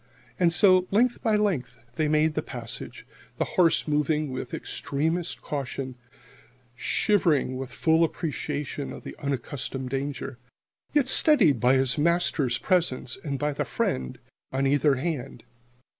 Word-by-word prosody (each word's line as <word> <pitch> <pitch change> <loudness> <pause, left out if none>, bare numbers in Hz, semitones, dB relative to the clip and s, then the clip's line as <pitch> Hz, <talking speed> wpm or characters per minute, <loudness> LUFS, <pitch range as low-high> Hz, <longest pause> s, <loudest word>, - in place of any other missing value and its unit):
And 175 -2 +4
so, 185 0 +5
length 240 +4 +2
by 220 -2 +2
length, 195 -12 0 0.2
they 155 +2 0
made 155 +1 +2
the 155 - -1
passage, 120 -6 -8 0.3
the - - 0
horse 170 -3 +2
moving 150 0 0
with 130 -1 -5
extremest 160 +5 -2
caution, 135 -2 -4 0.8
shivering 150 -1 +1
with 130 -1 -6
full 160 0 +3
appreciation 150 -3 -3
of - - -9
the - - -8
unaccustomed 135 -1 -4
danger, 135 -2 -4 0.5
yet 290 -4 +2
steadied 235 - +5
by 125 +4 +4
his 130 +2 +2
master's 155 -6 +1
presence 160 -7 0
and 140 -3 -3
by 150 +1 -1
the - - -1
friend 65 -1 -2 0.3
on 135 +1 0
either 145 +1 +3
hand. 135 -2 -4
150 Hz, 135 wpm, -26 LUFS, 135-170 Hz, 0.8 s, so